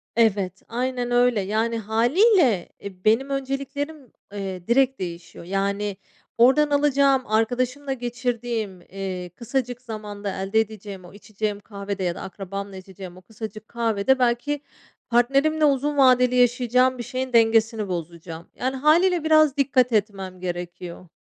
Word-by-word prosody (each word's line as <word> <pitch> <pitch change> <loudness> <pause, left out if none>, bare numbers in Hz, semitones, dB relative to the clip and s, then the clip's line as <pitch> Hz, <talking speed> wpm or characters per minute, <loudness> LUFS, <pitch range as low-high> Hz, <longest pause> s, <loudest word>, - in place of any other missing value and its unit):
Evet, 200 -5 +1
aynen 245 0 -2
öyle, 245 -3 +3
yani 220 +4 -1
hâliyle 240 - +3
e, 190 -2 -10
benim 230 +6 +3
önceliklerim, 275 +1 -4 0.2
eee, 190 -3 -6
direkt 265 +2 +3
değişiyor, 170 -1 -7
yani, 200 +1 -2 0.4
oradan 265 +5 +5
alacağım 280 -2 +3
arkadaşımla 250 +6 0
geçirdiğim, 240 -5 -3
eee, 185 -1 -6
kısacık 250 0 -3
zamanda 210 -4 -6
elde 195 +3 +1
edeceğim 205 -4 -5
o 175 - -14
içeceğim 210 0 -4
kahvede 200 -1 -6
ya 175 -1 -1
da - - -8
akrabamla 195 +1 -7
içeceğim 185 -1 -10
o - - -13
kısacık 215 +2 -9
kahvede 235 +2 +1
belki 250 +4 0 0.5
partnerimle 275 +6 +3
uzun 290 +1 +1
vadeli 250 -2 +5
yaşayacağım 250 +1 +3
bir 240 - -5
şeyin 260 +1 -4
dengesini 225 -1 +3
bozacağım. 170 -1 -6
Yani 260 +1 -2
hâliyle 330 +5 +3
biraz 310 -3 +4
dikkat 260 -3 +2
etmem 195 -3 -1
gerekiyor. 175 0 -6
230 Hz, 130 wpm, -23 LUFS, 195-260 Hz, 0.5 s, oradan